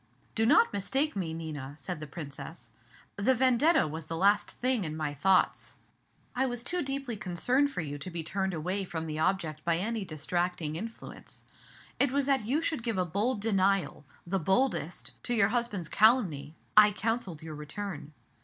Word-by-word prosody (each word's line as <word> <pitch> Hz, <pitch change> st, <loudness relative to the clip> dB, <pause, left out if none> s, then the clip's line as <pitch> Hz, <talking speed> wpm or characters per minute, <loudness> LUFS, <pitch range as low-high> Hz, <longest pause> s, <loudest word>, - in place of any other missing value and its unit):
"Do 225 Hz, 0 st, +2 dB
not 455 Hz, -, +5 dB
mistake 265 Hz, +9 st, 0 dB
me, 180 Hz, -5 st, -2 dB
Nina," 150 Hz, -4 st, -6 dB
said 150 Hz, +3 st, -4 dB
the 150 Hz, -, -7 dB
Princess, 140 Hz, -5 st, -8 dB, 0.5 s
"the 240 Hz, +6 st, +3 dB
'Vendetta' 260 Hz, -, +4 dB
was 155 Hz, +1 st, -6 dB
the 165 Hz, -, -3 dB
last 205 Hz, +3 st, +3 dB
thing 250 Hz, -4 st, 0 dB
in 155 Hz, -2 st, -4 dB
my 150 Hz, -2 st, -2 dB
thoughts. 185 Hz, +6 st, +2 dB, 0.6 s
I 265 Hz, +1 st, +2 dB
was 245 Hz, -1 st, -3 dB
too 355 Hz, +7 st, -2 dB
deeply 275 Hz, -3 st, -3 dB
concerned 245 Hz, +9 st, +1 dB
for 225 Hz, -, -3 dB
you 145 Hz, -2 st, -5 dB
to 185 Hz, -, -6 dB
be 170 Hz, -2 st, -4 dB
turned 190 Hz, +2 st, -2 dB
away 180 Hz, +5 st, -2 dB
from 165 Hz, -3 st, -4 dB
my 155 Hz, -1 st, -4 dB
object 160 Hz, -3 st, 0 dB
by 170 Hz, -1 st, +2 dB
any 220 Hz, +4 st, -2 dB
distracting 175 Hz, 0 st, -2 dB
influence. 225 Hz, +7 st, -8 dB, 0.6 s
It 280 Hz, -2 st, +4 dB
was 280 Hz, 0 st, +1 dB
that 265 Hz, -6 st, +1 dB
you 295 Hz, +7 st, +1 dB
should 315 Hz, -6 st, -1 dB
give 230 Hz, -3 st, -2 dB
a 185 Hz, -, +1 dB
bold 205 Hz, +6 st, -1 dB
denial 195 Hz, -6 st, +1 dB, 0.2 s
the 190 Hz, +2 st, -1 dB
boldest 190 Hz, -, 0 dB
to 245 Hz, -, 0 dB
your 205 Hz, -3 st, +4 dB
husband's 220 Hz, -7 st, -1 dB
calumny, 180 Hz, -, +3 dB, 0.2 s
I 210 Hz, 0 st, +8 dB
counselled 210 Hz, -7 st, -2 dB
your 160 Hz, -1 st, -7 dB
return. 155 Hz, 0 st, -6 dB
190 Hz, 175 wpm, -30 LUFS, 160-235 Hz, 0.6 s, I